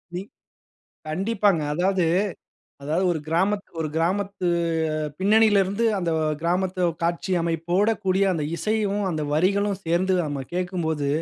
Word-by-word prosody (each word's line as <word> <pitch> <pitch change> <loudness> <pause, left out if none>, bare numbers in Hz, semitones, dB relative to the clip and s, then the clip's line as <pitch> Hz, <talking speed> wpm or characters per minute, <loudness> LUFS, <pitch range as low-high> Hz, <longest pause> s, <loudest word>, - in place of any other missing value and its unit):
நீ 180 - -2 0.9
கண்டிப்பாங்க. 195 +1 +1
அதாவது 185 +1 +1 0.8
அதாவது 160 +6 0
ஒரு 160 - -3
கிராமத் 190 +5 +1 0.3
கிராமத்து 185 +3 0 0.7
பின்னணியில 210 +1 +5
இருந்து, 200 +5 -1
அந்த 175 -3 -1 0.3
கிராமத்து 180 +2 0 0.2
காட்சி 170 +3 -1
அமைப்போடக்கூடிய 185 +4 +1
அந்த 160 -4 -2
இசையும், 210 0 0
அந்த 155 -4 -2
வரிகளும் 195 +5 +1
சேர்ந்து, 175 +3 +1
நம்ம 140 -2 -3
கேக்கும்போது, 175 -5 -1
185 Hz, 105 wpm, -24 LUFS, 165-200 Hz, 0.9 s, பின்னணியில